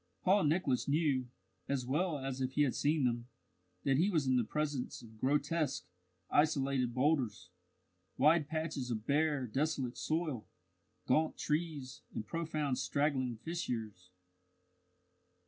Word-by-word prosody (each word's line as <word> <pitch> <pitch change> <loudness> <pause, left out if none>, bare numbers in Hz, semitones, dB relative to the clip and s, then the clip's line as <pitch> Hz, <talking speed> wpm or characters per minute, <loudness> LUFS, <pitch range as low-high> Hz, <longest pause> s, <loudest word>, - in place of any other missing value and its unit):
Paul 195 -1 +4
Nicholas 150 -4 +1
knew, 140 -4 +2 0.4
as 135 -3 0
well 155 +5 0
as 135 -1 -4
if 130 0 -1
he 150 - +4
had 135 - +1
seen 150 0 +1
them, 120 -1 0 0.6
that 135 -1 +3
he 180 +7 +3
was 160 -8 +1
in 130 -1 +3
the 125 - +3
presence 145 -2 -2
of 110 -1 -14
grotesque, 145 +1 +1 0.5
isolated 140 -4 +2
boulders, 130 - +1 0.7
wide 150 +2 +5
patches 155 -5 -2
of 110 -2 -3
bare, 145 -2 +2
desolate 135 0 -1
soil, 155 -8 -1 0.6
gaunt 155 +5 +2
trees, 150 -4 -2
and 110 - -3
profound 155 -5 -1
straggling 135 -3 0
fissures. 110 - -4
140 Hz, 130 wpm, -34 LUFS, 125-155 Hz, 0.7 s, wide